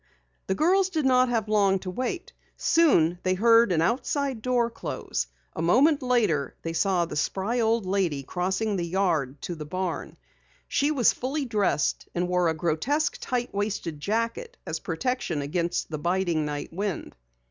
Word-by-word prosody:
The 190 - 0
girls 370 - +3
did 315 -6 -1
not 255 -1 +4
have 225 -3 0
long 200 -2 +3
to 185 - -5
wait. 255 - -4 0.2
Soon 175 - +3
they 185 0 +1
heard 230 +1 +5
an 165 -2 +2
outside 265 - -1
door 240 -1 +1
close. 65 - -4 0.3
A - - -3
moment 275 - +4
later 215 - +1
they 165 - -3
saw 175 +1 +2
the - - -7
spry 195 +10 -1
old 225 -2 +2
lady 185 -7 0
crossing 190 +7 -1
the 175 - -1
yard 165 -7 0
to 175 - -3
the 155 -2 -6
barn. 180 +2 -4 0.5
She 285 - +1
was 270 -7 +3
fully 275 +3 -2
dressed 210 - 0
and 175 +1 0
wore 180 -1 +2
a 160 - -1
grotesque 200 - 0
tight 250 -1 -2
waisted 200 -6 -3
jacket 230 - -2
as - - -3
protection 250 - -2
against 170 +3 -2
the 155 - -3
biting 175 -2 0
night 145 +1 -5
wind. 195 0 -3
195 Hz, 165 wpm, -26 LUFS, 170-250 Hz, 0.5 s, heard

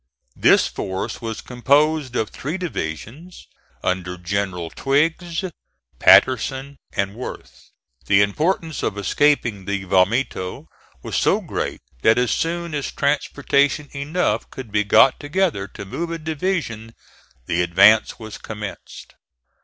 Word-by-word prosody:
This - - +5
force 95 +5 -4
was 115 -1 -5
composed 140 +2 +1
of 110 - -1
three 155 +7 -4
divisions, 155 - -6 0.4
under 90 0 -2
Generals 90 -2 -3
Twiggs, 165 +5 0 0.6
Patterson, 135 +2 +4 0.2
and 100 0 -1
Worth. 125 +4 -9 0.4
The 100 0 +5
importance 160 - -1
of 105 - -2
escaping 115 -2 +1
the 100 -1 -2
vomito 95 +1 0 0.4
was - - -5
so - - +3
great - - -4 0.2
that 110 - +4
as 125 -1 +2
soon 170 0 -2
as 145 -2 -3
transportation 145 0 +1
enough 150 +6 -1
could 130 -5 -9
be 105 0 +2
got 110 +5 +5
together 150 - -1
to 100 - -9
move 165 - -4
a 165 - -3
division 155 - -3 0.5
the 85 +5 0
advance 100 +5 +5
was 110 -2 -9
commenced. 105 -4 -8
125 Hz, 120 wpm, -21 LUFS, 100-150 Hz, 0.6 s, This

